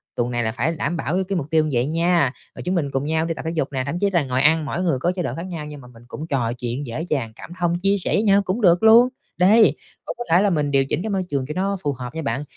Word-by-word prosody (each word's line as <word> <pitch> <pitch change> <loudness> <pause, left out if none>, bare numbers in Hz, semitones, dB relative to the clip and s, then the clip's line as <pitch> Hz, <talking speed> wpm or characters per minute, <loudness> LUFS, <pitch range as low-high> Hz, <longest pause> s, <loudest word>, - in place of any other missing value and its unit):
tuần 120 0 -1
này 120 -1 -1
là 110 - -1
phải 125 +8 -1
đảm 165 +2 -2
bảo 155 0 -3
cái 190 - +1
cái 195 - 0
mục 145 -3 -3
tiêu 155 -1 +2
vậy 125 -1 +1
nha, 165 -2 +2 0.2
rồi - - -8
chúng 180 +1 -1
mình 145 -5 -1
cùng 135 0 -2
nhau 160 +1 0
đi 165 - -2
tập - - -7
thể 160 - -1
dục 155 -4 0
nè, 130 -2 -2
thậm 170 +5 -3
chí 200 - +2
là 170 -5 +2
ngồi 130 -1 -1
ăn 155 +2 +4
mỗi 170 +5 -3
người 160 -8 +1
có 175 +6 +1
chế 185 - -2
độ - - -3
khác 165 - -6
nhau 170 -5 -6
nhưng 150 -1 -9
mà 125 - -14
mình 120 -1 -17
cũng 150 +5 -7
trò 125 -7 -1
chuyện, 125 +3 -4
dễ 120 +5 -5
dàng 130 -7 -1
cảm - - -11
thông, 175 0 0
chia 195 +2 +2
sẻ 185 - 0
với 210 - +2
nhau 200 -1 +4
cũng 200 +4 -3
được 175 0 +4
luôn. 230 +3 +7 0.3
Đấy, 210 +5 +5 0.3
cũng - - -5
có 240 - -4
thể 170 +3 +5
là 205 - +3
mình 150 -4 0
điều 135 -1 +3
chỉnh 150 - -2
cái 220 - -3
môi 190 -2 -1
trường 140 -2 -1
cho 150 - -4
nó 195 +2 -1
phù 145 - 0
hợp 130 +2 -8
nha 160 - -3
bạn, 135 -1 -2
160 Hz, 325 wpm, -22 LUFS, 135-180 Hz, 0.3 s, luôn